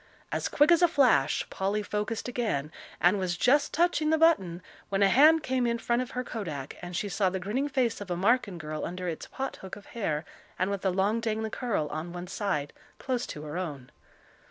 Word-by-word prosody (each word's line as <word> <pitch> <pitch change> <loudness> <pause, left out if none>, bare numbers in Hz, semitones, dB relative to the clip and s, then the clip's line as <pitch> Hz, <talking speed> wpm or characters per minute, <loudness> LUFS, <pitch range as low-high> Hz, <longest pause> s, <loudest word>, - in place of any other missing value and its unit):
As - - -1
quick 295 +4 +4
as 340 0 +5
a 350 - +7
flash 250 - +3
Polly 200 +2 -1
focussed 210 +3 -3
again, 215 - -2 0.3
and 180 +3 +4
was 180 -2 -1
just 285 +8 +3
touching 330 -2 +2
the 320 - +4
button, 190 - +3 0.3
when 195 0 +2
a 195 - +5
hand 305 +8 +6
came 255 -2 +1
in 235 0 +1
front 235 +1 0
of 255 - -4
her 250 - 0
kodak, 160 - -5
and 175 0 -6
she 205 - -1
saw 195 0 +1
the 190 +1 -3
grinning 235 +10 -1
face 255 -6 0
of 200 - -7
a 175 - -1
Marken 205 -1 +2
girl 155 -1 -5
under 180 +1 -4
its 165 -2 -4
pot 270 0 -5
hook 190 - -8
of 200 - -13
hair 165 -9 -2 0.3
and 185 +2 0
with 200 -2 -2
the 190 - +1
long, 195 +5 +1
dangling 220 -1 -2
curl 225 -12 -1
on 155 +3 -5
one 175 0 -5
side, 180 -7 -2 0.2
close 250 -2 -2
to 150 - -7
her 150 +3 -4
own. 145 -8 -6
205 Hz, 215 wpm, -28 LUFS, 175-250 Hz, 0.3 s, a